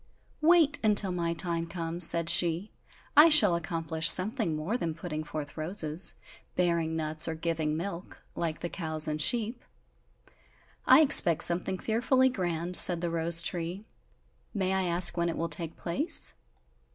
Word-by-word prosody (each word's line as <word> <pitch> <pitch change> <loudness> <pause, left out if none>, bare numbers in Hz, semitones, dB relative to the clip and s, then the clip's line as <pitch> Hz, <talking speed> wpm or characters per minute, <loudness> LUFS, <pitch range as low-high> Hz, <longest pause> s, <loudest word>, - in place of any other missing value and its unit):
"Wait, 315 -2 +3
until 205 -3 +3
my 170 -2 -3
time 170 0 -3
comes," 170 0 0
said 170 -1 0
she, 170 +4 +1 0.4
"I 300 +3 +7
shall 210 - +4
accomplish 165 -1 -2
something 200 - +2
more 155 +9 -4
than 165 -10 -4
putting 155 -2 -6
forth 150 -1 -8
roses, 160 0 -3 0.4
bearing 170 -2 -1
nuts, 155 0 +1
or 160 - -4
giving 160 -2 -3
milk, 180 +1 -8
like 165 -2 -4
the - - -4
cows 160 -3 -4
and 155 0 -1
sheep!" 235 - +1 1.2
"I - - +6
expect 175 - +6
something 180 +2 +1
fearfully 255 +5 0
grand," 175 -5 -4
said 175 -2 +4
the 170 -1 -3
rose 170 0 +3
tree, 175 +4 -5 0.7
"may 190 -2 -1
I 190 -1 -1
ask 175 0 +2
when 170 0 -1
it 165 - -5
will 165 0 -4
take 165 +1 0
place?" 295 - -2
170 Hz, 150 wpm, -27 LUFS, 165-195 Hz, 1.2 s, I